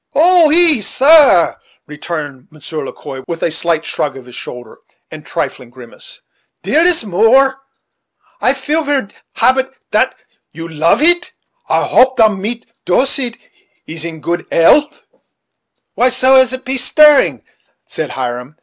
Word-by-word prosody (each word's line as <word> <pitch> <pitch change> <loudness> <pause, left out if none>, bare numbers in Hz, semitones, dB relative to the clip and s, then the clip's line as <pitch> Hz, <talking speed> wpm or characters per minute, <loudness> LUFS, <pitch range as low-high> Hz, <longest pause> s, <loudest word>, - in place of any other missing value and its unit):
"Ah! 345 +2 +4
oui; 325 -1 +4
ees, 210 - -4
sair," 275 - +4 0.3
returned 150 -3 -7
Monsieur 155 0 -8
Le - - -7
Quoi, 135 -2 -10
with 165 -1 -5
a 165 - 0
slight 165 0 -1
shrug 145 -2 -3
of 130 - -12
his 125 - -15
shoulder, 120 -2 -10 0.3
and - - -9
a - - -26
trifling 125 - -5
grimace, 120 -1 -10 0.4
"dere 315 - +1
is 350 -6 +3
more. 260 +8 +2 0.8
I 255 - +2
feel 295 +4 -2
ver 285 -8 -2 0.3
happi 265 +1 +2 0.2
dat - - +1 0.4
you 165 0 -9
love 165 - 0
eet. 350 +2 +1 0.4
I - - +1
hope 260 0 +2
dat 220 -2 +5
Madame 210 +4 -5 0.2
Doleet' 250 +3 0 0.5
is 160 0 -6
in 165 -2 -7
good 175 +2 -4
'ealth." 285 - +2 0.9
"Why, 250 - +2
so 255 +1 +2
as 260 -2 +5
to 260 - -3
be 260 +1 -3
stirring," 295 +3 +4 0.4
said 155 - -5
Hiram. 125 +2 -6
225 Hz, 150 wpm, -14 LUFS, -, 0.9 s, dat